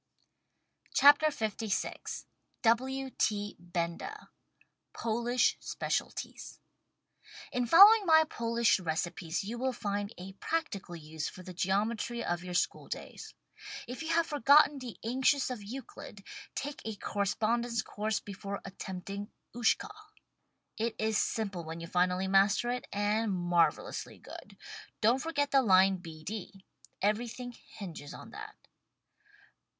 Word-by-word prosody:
WRITTEN 290 Hz, +2 st, +7 dB
FOR 230 Hz, -, -6 dB
MEN 215 Hz, -, -1 dB
BY -, -, -2 dB
MEN 220 Hz, -, -3 dB
LVI -, -, -5 dB, 0.4 s
W, 265 Hz, +3 st, +2 dB
T. 205 Hz, -1 st, 0 dB
Benda 175 Hz, -, -4 dB, 0.6 s
POLISH 235 Hz, +2 st, +1 dB
SPECIALTIES -, -, -4 dB, 0.9 s
In 245 Hz, -1 st, 0 dB
following 400 Hz, -, +9 dB
my 315 Hz, -1 st, +7 dB
Polish 235 Hz, -4 st, +2 dB
recipes 170 Hz, 0 st, -2 dB
you 230 Hz, +4 st, -5 dB
will 260 Hz, +1 st, +1 dB
find 205 Hz, -3 st, -3 dB
a 190 Hz, +2 st, -8 dB
prac 330 Hz, 0 st, -1 dB
tical 175 Hz, -4 st, -7 dB
use 155 Hz, 0 st, -5 dB
for 185 Hz, -, -11 dB
the 185 Hz, -, -8 dB
geometry 215 Hz, +6 st, 0 dB
of 175 Hz, 0 st, -2 dB
your 180 Hz, -1 st, -5 dB
school -, -, 0 dB
days. -, -, -7 dB, 0.5 s
If 250 Hz, +5 st, -6 dB
you 320 Hz, -, -4 dB
have 330 Hz, 0 st, +3 dB
forgotten 290 Hz, 0 st, +5 dB
the 250 Hz, -4 st, -7 dB
axioms 265 Hz, +2 st, +2 dB
of 245 Hz, -4 st, -5 dB
Euclid, 210 Hz, -2 st, -9 dB, 0.3 s
take 285 Hz, +1 st, -4 dB
a 220 Hz, -1 st, -4 dB
correspondence 220 Hz, +4 st, 0 dB
course 215 Hz, +1 st, -2 dB
before 200 Hz, 0 st, -6 dB
attempting 195 Hz, +1 st, -6 dB, 0.3 s
"Ushka." 240 Hz, -, +1 dB, 0.9 s
It 230 Hz, +1 st, -1 dB
is 220 Hz, 0 st, 0 dB
simple 200 Hz, -6 st, -1 dB
when 165 Hz, +1 st, -6 dB
you 165 Hz, -, -6 dB
finally 180 Hz, +2 st, +1 dB
master 200 Hz, +5 st, +3 dB
it 250 Hz, 0 st, -4 dB
— -, -, -43 dB
and 210 Hz, +2 st, +1 dB
marvel 175 Hz, -2 st, +2 dB
ously -, -, -6 dB
good. -, -, -12 dB, 0.4 s
Don't 230 Hz, +4 st, +4 dB
forget 285 Hz, -2 st, -1 dB
the 275 Hz, -, +6 dB
line 190 Hz, -3 st, +5 dB
B 160 Hz, -3 st, -10 dB
D. 195 Hz, 0 st, -7 dB, 0.4 s
Everything 235 Hz, +4 st, -1 dB
hinges 175 Hz, -10 st, -9 dB
on -, -, -11 dB
that. -, -, -9 dB
215 Hz, 135 wpm, -31 LUFS, 190-250 Hz, 0.9 s, following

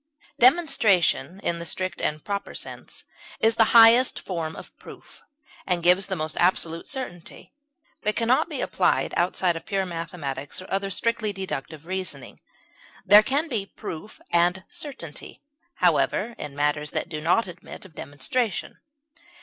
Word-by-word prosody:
Demonstration, 225 Hz, -, +3 dB
in 170 Hz, -, 0 dB
the 170 Hz, -, -6 dB
strict 185 Hz, +1 st, -4 dB
and 150 Hz, 0 st, -2 dB
proper 200 Hz, -1 st, -4 dB
sense, -, -, -7 dB, 0.4 s
is 225 Hz, +1 st, +4 dB
the 225 Hz, 0 st, +4 dB
highest 230 Hz, +3 st, +7 dB
form 165 Hz, -4 st, -4 dB
of -, -, -11 dB
proof, -, -, -13 dB, 0.5 s
and 175 Hz, -2 st, 0 dB
gives 180 Hz, +3 st, +4 dB
the 190 Hz, -, -2 dB
most 155 Hz, -2 st, -3 dB
absolute 170 Hz, -2 st, +1 dB
certainty, 250 Hz, -, -6 dB, 0.5 s
but 210 Hz, 0 st, 0 dB
can 230 Hz, -, -1 dB
not 255 Hz, -, +3 dB
be -, -, -4 dB
applied -, -, +1 dB
outside 175 Hz, 0 st, +1 dB
of 165 Hz, -, -6 dB
pure 195 Hz, -2 st, -1 dB
mathematics 165 Hz, -5 st, -5 dB
or 185 Hz, -, -8 dB
other 195 Hz, 0 st, 0 dB
strictly 220 Hz, +2 st, 0 dB
deductive 165 Hz, -6 st, -6 dB
reasoning; 185 Hz, +1 st, -5 dB, 0.7 s
there 205 Hz, +2 st, +9 dB
can 280 Hz, +8 st, 0 dB
be 230 Hz, -9 st, -1 dB
proof 185 Hz, +2 st, -8 dB
and 175 Hz, +2 st, +2 dB
certainty, 170 Hz, -, -8 dB, 0.3 s
however, 235 Hz, -, +2 dB
in 145 Hz, -2 st, -7 dB
matters 150 Hz, +1 st, 0 dB
that -, -, -3 dB
do 155 Hz, -3 st, -5 dB
not 180 Hz, +7 st, +2 dB
admit 175 Hz, +1 st, -10 dB
of 185 Hz, -, -15 dB
demonstration. 180 Hz, -, -3 dB
185 Hz, 150 wpm, -25 LUFS, 165-215 Hz, 0.7 s, there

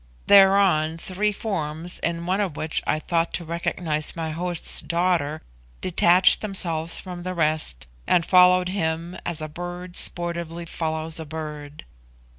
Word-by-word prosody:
Thereon, 195 Hz, -5 st, +5 dB
three 190 Hz, +5 st, -1 dB
forms, 170 Hz, -5 st, -4 dB
in 170 Hz, 0 st, -3 dB
one 190 Hz, +3 st, 0 dB
of 185 Hz, -7 st, -2 dB
which 155 Hz, 0 st, -1 dB
I -, -, +1 dB
thought 165 Hz, +1 st, -1 dB
to 175 Hz, -, -4 dB
recognise 165 Hz, -2 st, -1 dB
my 160 Hz, -1 st, -4 dB
host's 175 Hz, +1 st, -1 dB
daughter, 170 Hz, -3 st, -1 dB, 0.4 s
detached 180 Hz, +1 st, +4 dB
themselves 170 Hz, -6 st, -1 dB
from 180 Hz, -2 st, -8 dB
the 185 Hz, +1 st, -5 dB
rest, 155 Hz, -, 0 dB, 0.2 s
and 170 Hz, -2 st, +3 dB
followed 180 Hz, 0 st, +5 dB
him 170 Hz, -1 st, -3 dB
as 165 Hz, -3 st, -1 dB
a -, -, -4 dB
bird 175 Hz, +3 st, -8 dB
sportively 170 Hz, -1 st, +1 dB
follows 160 Hz, -1 st, -2 dB
a 160 Hz, -, -6 dB
bird. 150 Hz, -1 st, -8 dB
170 Hz, 140 wpm, -23 LUFS, 155-180 Hz, 0.4 s, Thereon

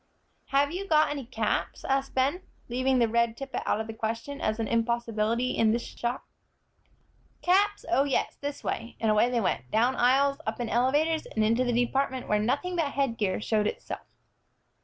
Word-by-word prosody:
"Have 280 Hz, +1 st, +2 dB
you 385 Hz, +3 st, -4 dB
got 310 Hz, -3 st, +4 dB
any 280 Hz, -5 st, -5 dB
caps?" 225 Hz, -4 st, -2 dB
asked 270 Hz, 0 st, -1 dB
Ben, 275 Hz, +8 st, +1 dB, 0.3 s
leaving 255 Hz, +2 st, +1 dB
the 235 Hz, -2 st, +4 dB
red 235 Hz, 0 st, +1 dB
tippet 270 Hz, -2 st, -4 dB
out -, -, +1 dB
of 220 Hz, -, -2 dB
the 225 Hz, -, -7 dB
question 230 Hz, +6 st, -4 dB
as 215 Hz, +1 st, -1 dB
an 225 Hz, -, -1 dB
impossibility 230 Hz, +1 st, 0 dB
in 220 Hz, -1 st, +3 dB
this 235 Hz, -, -2 dB
shop. 240 Hz, +2 st, -4 dB, 1.2 s
"Caps? 405 Hz, +3 st, +2 dB
Oh, 335 Hz, -5 st, +3 dB
yes, 280 Hz, -1 st, 0 dB
this 285 Hz, 0 st, -5 dB
way," 230 Hz, +1 st, -4 dB
and 220 Hz, -1 st, +2 dB
away 215 Hz, +3 st, +4 dB
they 245 Hz, -1 st, +1 dB
went, 130 Hz, -, -1 dB
down 240 Hz, +4 st, +2 dB
aisles, 275 Hz, +3 st, +3 dB
up 220 Hz, -, -2 dB
in 240 Hz, -2 st, -2 dB
elevators, 295 Hz, +7 st, +1 dB
and 220 Hz, -, -1 dB
into 230 Hz, +3 st, +2 dB
the 245 Hz, -, 0 dB
department 265 Hz, 0 st, -1 dB
where 210 Hz, -, +2 dB
nothing 285 Hz, +12 st, -1 dB
but 320 Hz, -5 st, 0 dB
headgear 230 Hz, -9 st, 0 dB
showed 210 Hz, -1 st, +1 dB
itself. -, -, -6 dB
245 Hz, 180 wpm, -28 LUFS, 225-280 Hz, 1.2 s, got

